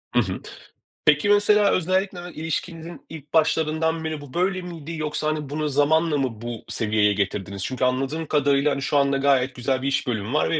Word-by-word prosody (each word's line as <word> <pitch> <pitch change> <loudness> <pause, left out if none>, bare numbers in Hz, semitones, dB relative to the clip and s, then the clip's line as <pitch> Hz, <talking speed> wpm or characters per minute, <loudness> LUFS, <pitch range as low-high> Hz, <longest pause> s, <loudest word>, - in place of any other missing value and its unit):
Iı - - +6
hı. - - -5 0.6
Peki, 150 +6 +4
mesela 205 0 +4
özellikle 185 +1 0
de 175 - -9
ilişkinizin 165 0 -5
ilk 150 -3 -11
başlarından 160 0 +1
beri 155 -2 -3
bu 140 -3 -12
böyle 185 +1 0
miydi 170 -3 -7
yoksa, 155 0 -2
hani, 155 -2 -2
bunu 150 +1 -2
zamanla 150 +2 +2
mı 125 -6 -2
bu 120 -2 -6
seviyeye 105 -2 +2
getirdiniz? 100 -1 -3
Çünkü 130 0 -1
anladığım 135 +5 -1
kadarıyla, 145 0 +2
hani, 140 0 -2
şu 145 - +1
anda 140 0 +3
gayet 135 -2 +2
güzel 130 +1 -1
bir 135 - -2
iş 140 0 0
bölümü 110 0 -2
var 150 - +2
ve 165 - +1
150 Hz, 195 wpm, -23 LUFS, 130-160 Hz, 0.6 s, Iı